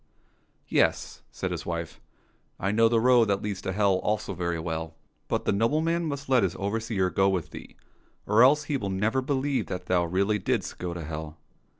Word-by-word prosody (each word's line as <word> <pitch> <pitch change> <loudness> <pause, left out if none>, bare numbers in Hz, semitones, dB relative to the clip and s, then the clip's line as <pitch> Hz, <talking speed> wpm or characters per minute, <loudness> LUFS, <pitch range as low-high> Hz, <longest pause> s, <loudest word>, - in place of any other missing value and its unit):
" - - -40 0.2
Yes," - - +1
said - - -4
his - - -4
wife, 85 -1 -5 0.3
" - - -41
I 95 - 0
know 115 +2 +4
the 115 0 +3
road 125 0 +5
that 100 -2 -1
leads 100 -2 -3
to 95 - -3
hell 100 -1 +2
also 105 0 -2
very 85 -1 -2
well; 80 0 -4 0.3
but - - -1
the - - +2
nobleman 155 +11 +1
must 140 -1 -5
let 130 -2 +4
his 95 -2 0
overseer 100 -2 -1
go 95 0 +3
with 95 -4 -2
thee, - - -10 0.5
or 105 +3 +4
else 145 +4 +6
he 145 -2 -2
never 105 +5 0
will 130 - -5
believe 140 -1 0
that 90 0 -5
thou 90 -1 +2
really 100 +5 +1
didst - - -2
go 90 -1 -4
to 85 - -5
hell." 80 0 -6
100 Hz, 205 wpm, -27 LUFS, 90-120 Hz, 0.5 s, else